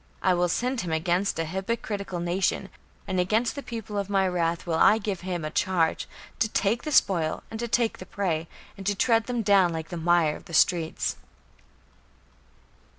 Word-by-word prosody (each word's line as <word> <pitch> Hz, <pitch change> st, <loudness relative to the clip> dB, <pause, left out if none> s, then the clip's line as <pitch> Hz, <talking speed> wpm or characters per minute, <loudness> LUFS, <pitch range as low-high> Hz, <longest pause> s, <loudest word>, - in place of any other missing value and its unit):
I 185 Hz, -, +4 dB
will 175 Hz, 0 st, +1 dB
send 250 Hz, +6 st, 0 dB
him 175 Hz, -3 st, -4 dB
against 175 Hz, +4 st, 0 dB
an 165 Hz, -, -1 dB
hypocritical 195 Hz, +1 st, -3 dB
nation, 175 Hz, +2 st, 0 dB, 0.4 s
and 185 Hz, -, -1 dB
against 220 Hz, +6 st, +1 dB
the 280 Hz, -, -6 dB
people 225 Hz, -5 st, -5 dB
of 200 Hz, 0 st, -3 dB
my 195 Hz, -1 st, +2 dB
wrath 170 Hz, -2 st, -1 dB
will 165 Hz, -2 st, 0 dB
I 215 Hz, -, +6 dB
give 200 Hz, -4 st, -3 dB
him 175 Hz, -3 st, -3 dB
a 155 Hz, -, -4 dB
charge, 170 Hz, -2 st, +1 dB, 0.3 s
to 220 Hz, -, +2 dB
take 215 Hz, +3 st, +1 dB
the 305 Hz, -, -4 dB
spoil, 170 Hz, -, +2 dB
and 220 Hz, -, -5 dB
to 235 Hz, -, -2 dB
take 230 Hz, 0 st, +1 dB
the 185 Hz, -, -9 dB
prey, 165 Hz, -5 st, -2 dB, 0.3 s
and 195 Hz, -, -8 dB
to 205 Hz, -, +2 dB
tread 225 Hz, +2 st, +2 dB
them 245 Hz, -2 st, -1 dB
down 195 Hz, -4 st, +4 dB
like 160 Hz, -1 st, -5 dB
the 175 Hz, -, -5 dB
mire 165 Hz, -2 st, +3 dB
of -, -, -12 dB
the 170 Hz, -4 st, -5 dB
streets." 165 Hz, 0 st, +2 dB
190 Hz, 190 wpm, -26 LUFS, 170-215 Hz, 0.4 s, I